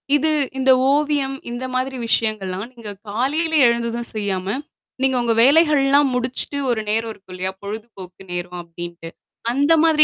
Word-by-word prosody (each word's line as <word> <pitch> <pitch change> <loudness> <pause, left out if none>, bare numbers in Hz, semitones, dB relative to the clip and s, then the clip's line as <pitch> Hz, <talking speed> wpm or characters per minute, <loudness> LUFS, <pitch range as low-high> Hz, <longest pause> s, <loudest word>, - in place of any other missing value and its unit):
இது 305 +2 +2 0.3
இந்த 260 0 +4 0.2
ஓவியம், 290 -2 +1 0.2
இந்த 240 +2 -4
மாதிரி 260 +1 -1
விஷயங்கள்லாம் 215 -2 -1
நீங்க 220 -3 -8 0.2
காலையில 295 +9 0
எழுந்ததும் 235 0 -1
செய்யாம, 195 -3 -2 0.6
நீங்க 265 -1 +2
உங்க 235 -1 +2
வேலைகள் 300 +1 +5
எல்லாம் 280 0 +4
முடிச்சுட்டு 255 +3 -2
ஒரு 230 -3 +1
நேரம் 225 +1 0
இருக்கும் 190 -2 -15
இல்லையா? 185 +1 -2
பொழுதுபோக்கு 200 -4 -8
நேரம் 180 0 -4
அப்படின்னுட்டு. 170 0 -8 0.4
அந்த 285 +4 +3
மாதிரி 315 -2 +6
235 Hz, 145 wpm, -21 LUFS, 200-275 Hz, 0.6 s, மாதிரி